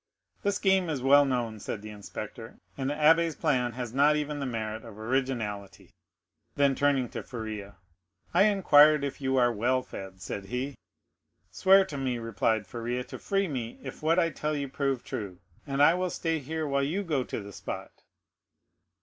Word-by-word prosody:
"The 200 - +1
scheme 190 -3 +2
is 140 -5 -2
well 140 +2 +6
known," 120 -5 -2
said 105 0 -5
the 110 - -7
inspector; 105 -1 -8 0.2
"and 135 -1 -2
the 145 - -1
abbé's 160 +1 +4
plan 125 -6 0
has 120 -1 -5
not 145 +3 +4
even 150 -1 -2
the 135 - -2
merit 110 -2 -4
of 115 -3 -11
originality." 110 -5 -3 0.6
Then 140 -1 +3
turning 135 -2 +2
to - - -5
Faria, 110 -4 -7 0.6
"I 200 - +6
inquired 155 -8 +6
if 140 0 -4
you 130 0 +1
are 120 -1 +4
well 125 +4 +1
fed?" 95 -4 -9
said 95 +2 -6
he. 125 +7 -3 0.8
"Swear 195 0 +5
to 150 -7 -6
me," 130 -2 -1
replied 110 -1 0
Faria, 120 +4 -3
"to 125 - -9
free 195 -1 0
me 125 -7 -4
if 130 -1 -8
what 160 +2 +2
I 165 -2 +3
tell 150 0 -2
you 140 -1 -2
prove 135 -1 -1
true, 95 -4 -5 0.3
and 140 +1 +2
I 160 - +7
will 180 +1 -1
stay 165 -2 -1
here 155 +3 -3
while 140 0 +1
you 165 +9 -1
go 150 -8 0
to - - -5
the 100 -1 -9
spot." - - -6
135 Hz, 185 wpm, -28 LUFS, 115-150 Hz, 0.8 s, I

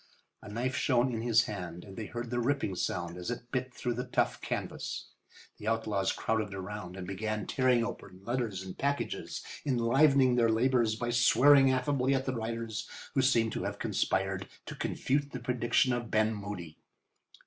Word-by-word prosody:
A - - -10
knife 125 +5 -2
shone 125 -1 +2
in 115 - -2
his 120 0 +4
hand, 90 -5 -6
and 95 -2 -11
they 110 0 -5
heard 120 0 -5
the 120 - 0
ripping 125 -5 0
sound 90 -1 -2
as 90 +3 -5
it 120 0 -5
bit 130 0 -2
through 125 -1 -2
the 125 +2 -4
tough - - 0
canvas. - - -4 0.5
The 105 - -7
outlaws 110 -4 +1
crowded 110 -3 -1
around 95 -1 -6
and 95 - -5
began 105 +2 -3
tearing 125 -3 +2
open 95 -5 -8
letters 115 -6 -2
and 95 -1 -8
packages, 140 0 -2 0.2
enlivening 130 0 +4
their 115 -1 +4
labours 115 -1 +3
by 120 +1 -2
swearing 135 +3 +6
affably 130 0 +2
at 135 0 -1
the 130 - -1
writers, 115 -2 -4 0.2
who 135 - +3
seemed 115 -4 +3
to - - -3
have - - -3
conspired 95 0 0 0.2
to - - -6
confute 140 +1 -1
the 125 - -3
prediction 125 +1 +2
of 120 -2 -3
Ben 110 +1 +2
Moody. 100 -6 -7
115 Hz, 175 wpm, -31 LUFS, 105-125 Hz, 0.5 s, swearing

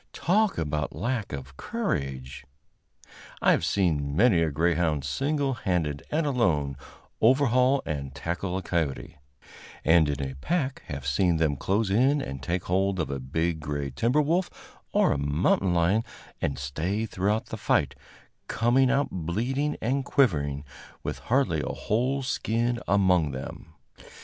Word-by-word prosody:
Talk 210 +4 +2
about 75 -2 -2
a - - -10
lack 120 -4 -2
of 70 -1 -7
courage! 70 - -3 1.0
I - - +4
have - - +2
seen 75 -7 +1
many 100 -2 +4
a 80 - +2
greyhound 80 -1 +1
single 140 - 0
handed 85 - -1
and 155 +1 0
alone 85 - +1 0.5
overhaul 130 +2 +4
and 70 -4 -4
tackle 90 +4 -3
a 95 - -4
coyote, 80 -2 -2 0.7
and 80 -2 +5
in 70 -1 -2
a 65 - -6
pack 140 - -1
have 70 -2 -6
seen 80 +5 +2
them 80 -3 +1
close 95 +7 0
in 130 +8 +3
and 70 - -5
take 85 +5 -2
hold 95 +1 0
of 80 -4 -1
a 70 - -3
big 80 +5 -1
gray 70 -2 -3
timber 120 - +2
wolf 175 +5 +1 0.4
or - - +3
a 70 - 0
mountain 80 +5 +1
lion 90 +6 +3 0.4
and 70 -2 -1
stay 80 +10 -2
throughout 105 +1 -1
the - - -4
fight, - - +1 0.5
coming 125 +3 +3
out 135 +1 +2
bleeding 120 - -1
and 135 +4 0
quivering, 75 - +1 0.4
with - - -4
hardly 120 - +2
a - - -3
whole 130 +5 0
skin 120 -1 0
among 90 -7 +3
them. 80 +5 -8
90 Hz, 150 wpm, -27 LUFS, -, 1.0 s, and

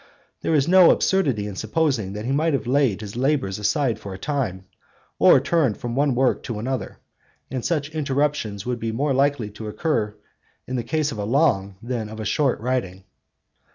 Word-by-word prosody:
There 160 - +1
is 145 0 +2
no 185 0 +7
absurdity 135 - +2
in 105 -2 -6
supposing 110 -2 0
that 105 +2 -5
he 130 - -1
may 155 +4 +2
have 135 - -1
laid 125 -5 +2
his 105 0 -7
labours 130 -7 0
aside 110 +2 0
for 100 -3 -7
a - - -8
time, 105 -7 -3 0.5
or - - +7
turned 140 -4 +1
from 120 -1 -4
one 140 -1 +2
work 130 +1 +2
to 115 - -4
another; 125 +3 -4 0.5
and 130 -3 -3
such 150 -3 -1
interruptions 140 -8 -1
would 125 -1 -2
be 115 0 -2
more 135 +5 0
likely 135 -5 +1
to 110 +1 -8
occur 105 -3 -1 0.5
in 130 - -4
the 120 - -1
case 155 0 -1
of 110 - -6
a - - -1
long 100 -6 +1
than 120 -3 -3
of 110 0 -8
a 110 - -4
short 135 +5 +1
writing. 110 -7 -2
125 Hz, 190 wpm, -23 LUFS, 105-145 Hz, 0.5 s, no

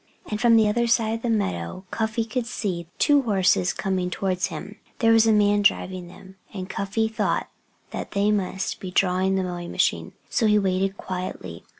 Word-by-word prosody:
And 210 - -2
from 235 -1 +5
the 220 -1 +5
other 235 +3 +1
side 230 -2 +2
of 225 - -4
the 240 - -2
meadow 185 - -2
Cuffy 220 0 -1
could 230 +1 -3
see 185 -8 -3
two 290 -2 +4
horses 190 -6 +2
coming 190 -2 -2
towards 185 0 -1
him. - - -8 0.2
There 225 -1 +3
was 225 0 +5
a - - +5
man 205 -1 +3
driving 185 -2 +1
them. 190 +2 -14
And 185 -3 -6
Cuffy 200 +3 -1
thought 220 - -1 0.4
that - - -5
they 200 +1 +2
must 190 -2 -2
be 185 - -6
drawing 185 +1 +2
the 190 - 0
mowing 175 -1 -5
machine. - - 0
So 225 - +1
he 210 0 +4
waited 195 0 0
quietly. 185 -1 -6
200 Hz, 190 wpm, -24 LUFS, 185-220 Hz, 0.4 s, from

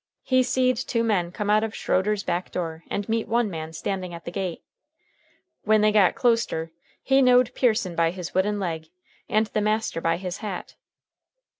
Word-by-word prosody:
He 255 -1 +3
seed 255 0 +2
two 235 -2 -1
men 185 -6 +1
come 210 +2 -2
out 215 +1 +4
of 220 -1 -3
Schroeder's 200 +2 0
back 175 +1 -2
door 165 -2 -4
and 205 - -3
meet 225 0 -1
one 230 -2 +1
man 160 -1 -5
standing 185 +1 -4
at 170 - -11
the - - -5
gate. 185 -3 -4 1.0
When 215 0 +4
they 215 0 +4
got 205 -3 +4
closter 230 -10 +1 0.3
he 270 0 +4
knowed 250 -1 +5
Pearson 215 -8 +1
by 165 0 +3
his 180 -1 -6
wooden 205 +3 +1
leg 165 -4 -3 0.4
and 215 +1 +3
the 215 0 -2
master 215 -4 0
by 165 0 +1
his 180 0 -5
hat. 205 -4 -6
205 Hz, 180 wpm, -25 LUFS, 175-225 Hz, 1.0 s, knowed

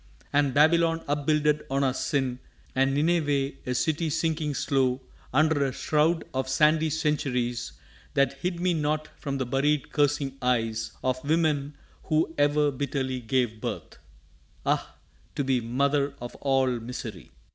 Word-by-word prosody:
And 145 -1 +3
Babylon 165 +2 +4
upbuilded 150 +1 +1
on 135 +1 +1
our 130 -2 +2
sin; 130 -2 -1 0.3
And 135 +1 +2
Nineveh, 145 -3 +1 0.2
a 125 - -1
city 160 +4 0
sinking 160 -1 -1
slow 130 -2 +1 0.3
Under 155 +1 +3
a 135 - 0
shroud 155 +5 +1
of 130 0 -2
sandy 155 +3 +3
centuries 125 -6 -1 0.4
That 140 -2 +2
hid 175 -1 -2
me 180 0 +2
not 155 -1 -1
from 140 -2 -4
the 130 - -1
buried 140 +3 0
cursing 145 -2 0
eyes 115 -3 0
Of 130 0 -1
women 150 -2 +1 0.3
who 160 +1 +1
e'er 145 0 +3
bitterly 130 -1 -2
gave 120 -2 -1
birth! - - -5 0.7
Ah, - - 0 0.4
to 145 - 0
be 130 -2 +1
mother 140 +4 0
of 120 0 -7
all 135 -3 +1
misery! 115 - -7
140 Hz, 140 wpm, -27 LUFS, 130-150 Hz, 0.7 s, Babylon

